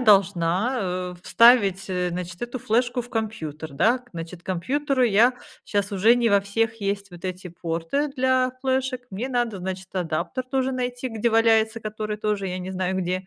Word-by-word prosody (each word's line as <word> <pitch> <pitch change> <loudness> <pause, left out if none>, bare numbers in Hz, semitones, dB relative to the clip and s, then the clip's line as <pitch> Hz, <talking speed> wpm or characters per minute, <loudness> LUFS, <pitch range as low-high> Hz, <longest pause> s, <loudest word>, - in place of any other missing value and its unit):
должна, 195 +1 +3
э, 180 -1 -3
вставить, 200 -6 +5
э, 180 -1 0
значит, 175 +1 -6
эту 240 +2 -4
флешку 245 +3 +1
в 245 - -13
компьютер, 160 - -4
да, 230 - +3
к 245 0 -23
значит, 165 +1 -7
компьютеру 260 - 0
я 235 +3 +4 0.3
щас 200 -1 -1
уже 205 +5 +5
не 240 -1 +2
во 200 -2 +4
всех 225 +3 -1
есть 200 0 -2
вот 175 0 -13
эти 185 0 -4
порты 170 - -2
для 260 -2 +1
флешек. 260 -1 0
Мне 210 +7 -4
надо, 240 -5 -1
значит, 190 +1 -5
адаптер 170 +6 -2
тоже 265 0 0
найти, 250 0 -3
где 225 0 0
валяется, 225 0 +3
который 215 0 -4
тоже, 210 -2 -1
я 185 0 -3
не 185 +1 -5
знаю, 185 0 -1
где. 185 0 -2
210 Hz, 175 wpm, -24 LUFS, 185-245 Hz, 0.3 s, вставить